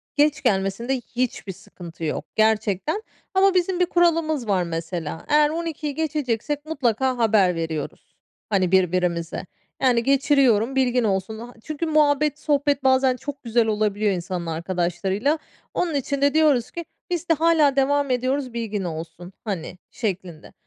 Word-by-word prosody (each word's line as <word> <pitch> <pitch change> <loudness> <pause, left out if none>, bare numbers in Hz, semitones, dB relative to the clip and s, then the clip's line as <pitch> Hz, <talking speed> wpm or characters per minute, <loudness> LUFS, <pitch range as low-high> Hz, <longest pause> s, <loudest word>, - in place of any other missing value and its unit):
Geç 295 0 +2
gelmesinde 195 +6 0 0.2
hiçbir 240 -5 -2
sıkıntı 175 -3 -11
yok 155 - -2
gerçekten. 220 - +1 0.3
Ama 385 0 +4
bizim 365 0 +1
bir 360 - +4
kuralımız 330 -7 +1
var, 190 -3 +2
mesela. 165 -1 -5
Eğer 300 0 +5
00.00'da 315 -3 -4
geçeceksek 295 -2 -2
mutlaka 260 -4 0
haber 210 -6 +3
veriyoruz, 160 -3 -5 0.3
hani, 190 -4 +1
birbirimize. 180 -3 +1 0.4
Yani, 245 -3 +3
geçiriyorum 270 -3 +3
bilgin 250 -2 +2
olsun. 205 +1 -1
A 240 +2 -9
çünkü 310 +1 -3
muhabbet 300 -1 +2
sohbet 285 -2 +1
bazen 260 -1 +4
çok 285 +1 -7
güzel 230 -1 +2
olabiliyor 210 -1 +1
insanın 180 -1 -3
arkadaşlarıyla. 180 - -1 0.3
Onun 340 -4 -1
için 280 0 -2
de 285 0 +3
diyoruz 300 -7 +3
ki 340 -1 -6 0.2
"Biz 350 -1 -3
de - - +6
hâlâ 315 -3 +3
devam 280 +1 +2
ediyoruz 255 +1 -1
bilgin 220 -4 -3
olsun," 170 +2 -7
hani, 180 -5 -5
şeklinde. 185 -6 -5
245 Hz, 140 wpm, -23 LUFS, 190-295 Hz, 0.4 s, de